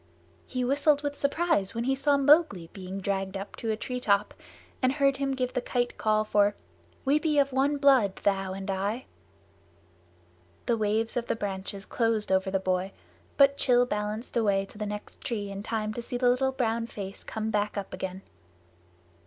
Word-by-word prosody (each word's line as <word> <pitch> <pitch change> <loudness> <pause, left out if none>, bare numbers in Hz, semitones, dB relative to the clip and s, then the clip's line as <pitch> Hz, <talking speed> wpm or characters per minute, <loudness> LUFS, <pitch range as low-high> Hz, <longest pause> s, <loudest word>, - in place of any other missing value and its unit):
He 255 - -2
whistled 285 +2 +3
with 290 0 -2
surprise 280 - 0
when 230 - -1
he 265 +2 +1
saw 280 +1 +2
Mowgli 280 - +4
being 190 0 -6
dragged 195 0 -2
up 195 +1 -7
to 225 - -4
a 215 - 0
treetop 215 -4 0 0.5
and 255 0 +3
heard 275 -1 +2
him 275 0 -1
give 255 -1 -2
the 250 - 0
Kite 245 0 -1
call 215 0 +2
for 205 -1 +2 0.5
"We 285 +3 +4
be 305 -2 0
of 280 -1 +3
one 280 +2 +2
blood, 265 -9 +4
thou 195 -1 0
and 195 +1 -4
I." 200 +6 -2 1.6
The 235 - +2
waves 220 +2 0
of 240 - -2
the - - 0
branches 195 -1 -5
closed 225 -4 0
over 190 0 +2
the 195 0 +1
boy, 185 0 -1 0.4
but 280 -1 +5
Rann 245 0 +6
balanced 210 0 -3
away 200 -4 +2
to 205 - -15
the 210 - -2
next 210 0 -7
tree 205 -4 -3
in 195 0 -5
time 215 0 -2
to 235 - -4
see 245 +1 -4
the 245 0 +3
little 265 +2 +2
brown 230 -3 -1
face 195 -3 -7
come 220 0 -3
up 205 -1 -1
again. 185 +1 -5
220 Hz, 180 wpm, -28 LUFS, 200-265 Hz, 1.6 s, Rann